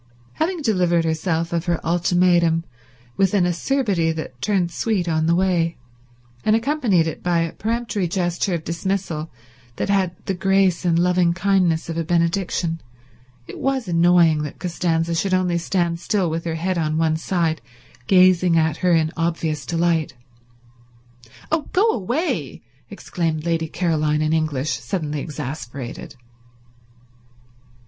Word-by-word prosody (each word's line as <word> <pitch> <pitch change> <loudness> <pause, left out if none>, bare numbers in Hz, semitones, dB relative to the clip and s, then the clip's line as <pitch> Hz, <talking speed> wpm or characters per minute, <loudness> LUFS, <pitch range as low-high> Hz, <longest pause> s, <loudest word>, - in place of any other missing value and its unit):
Having 335 0 -2
delivered 180 -7 +2
herself 165 +1 -1
of 170 0 -1
her 170 -2 0
ultimatum 175 -1 +2 0.5
with 195 +1 +2
an 185 -3 +3
acerbity 180 -2 0
that 155 -6 -7
turned 190 -5 0
sweet 195 -2 -1
on 160 -1 +1
the 170 - +3
way, 175 -3 +1 0.7
and 215 - +3
accompanied 230 - +2
it 160 - -5
by 175 -1 +1
a 165 -1 -2
peremptory 225 -3 -2
gesture 175 +1 -1
of 165 - -5
dismissal 170 -2 -3 0.5
that - - -3
had 190 -3 +1
the 195 - -1
grace 190 -1 +2
and 170 -1 +3
loving 175 -1 +2
kindness 185 -4 +1
of 165 0 -3
a - - 0
benediction, 170 0 0 0.6
it - - -9
was 265 -4 -1
annoying 170 -2 +4
that 150 -2 -6
Costanza 170 -2 -1
should 185 +3 +1
only 180 -2 +1
stand 170 -1 -1
still 185 -3 0
with 165 +1 -3
her 165 -1 -2
head 175 +2 -1
on 155 -1 0
one 160 -1 +2
side 160 -1 -1 0.5
gazing 180 -2 +5
at 160 -1 +1
her 180 -1 +2
in 160 -1 +2
obvious 165 -3 -2
delight. 165 -3 0 1.4
"Oh, 320 -2 0
go 400 +5 +4
away!" 235 - -2 0.3
exclaimed 165 -5 -3
Lady 165 -1 0
Caroline 155 -3 0
in 155 +1 +1
English, 155 -3 -1
suddenly 155 -6 -3
exasperated. 140 -1 -6
170 Hz, 140 wpm, -21 LUFS, 160-185 Hz, 1.4 s, gazing